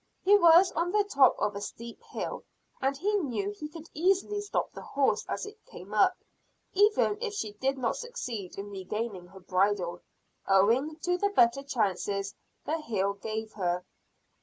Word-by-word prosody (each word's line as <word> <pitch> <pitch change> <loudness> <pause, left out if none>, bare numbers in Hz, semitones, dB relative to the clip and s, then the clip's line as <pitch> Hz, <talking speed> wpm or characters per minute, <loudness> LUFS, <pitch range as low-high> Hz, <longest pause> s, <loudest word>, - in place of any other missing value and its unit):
He 400 +2 +6
was 345 -1 +7
on 340 +2 -1
the 415 +1 +3
top 280 -10 +4
of 210 -1 -1
a 200 - -4
steep 235 +3 -8
hill, - - -5 0.4
and 270 +1 0
he 405 +7 0
knew 230 - -2
he 300 +9 -7
could 320 +1 -10
easily 390 +5 +1
stop 410 - -2
the - - -9
horse 275 -1 +1
as - - -2
it 425 +1 -12
came - - -11
up; - - +4 0.6
even 415 +1 +3
if 435 -3 -3
she 215 - -3
did 265 +6 -1
not 245 -3 -1
succeed 250 - -6
in 200 +1 -6
regaining 195 0 -4
her 190 +2 -14
bridle, 185 -1 0 0.5
owing 230 +11 +3
to 355 0 +1
the 405 - +2
better 245 -8 +4
chances 200 -6 -1 0.3
the 320 +2 -1
hill 200 -7 0
gave 220 +2 -5
her. 180 -2 -1
255 Hz, 170 wpm, -29 LUFS, -, 0.6 s, was